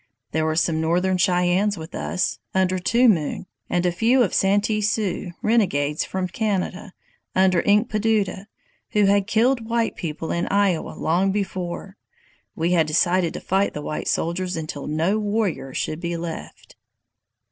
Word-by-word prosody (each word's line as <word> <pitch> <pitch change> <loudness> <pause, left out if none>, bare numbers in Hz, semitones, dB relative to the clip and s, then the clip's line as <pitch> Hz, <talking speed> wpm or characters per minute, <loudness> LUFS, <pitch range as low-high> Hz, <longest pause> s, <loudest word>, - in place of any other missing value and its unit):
There 160 0 0
were 160 0 0
some 160 -1 +1
Northern 180 +3 +1
Cheyennes 180 +3 +2
with 160 +1 -9
us, 180 - -2 0.2
under 185 0 +2
Two 235 +7 +3
Moon, 170 -5 +1 0.2
and 175 0 0
a 180 - +3
few 235 +6 +3
Santee 205 +2 +2
Sioux, 205 -3 -1
renegades 155 -10 +1
from 185 -1 -2
Canada, 195 -1 -2 0.4
under 185 -2 +4
Inkpaduta, 210 -1 +1 0.5
who 210 -1 +4
had 200 0 +3
killed 230 +1 +2
white 230 -1 0
people 160 -1 -4
in 170 - -1
Iowa 200 -4 +1
long 185 +4 +1
before. 190 -1 -4 0.6
We 165 +2 0
had 165 -3 +3
decided 175 +2 +2
to - - -4
fight 195 +2 0
the 150 - -5
white 150 - -4
soldiers 180 +1 -1
until 155 -3 -5
no 165 +8 +1
warrior 205 -9 -1
should 155 +4 -3
be 170 0 -3
left." 165 -1 -8
185 Hz, 145 wpm, -23 LUFS, 170-205 Hz, 0.6 s, under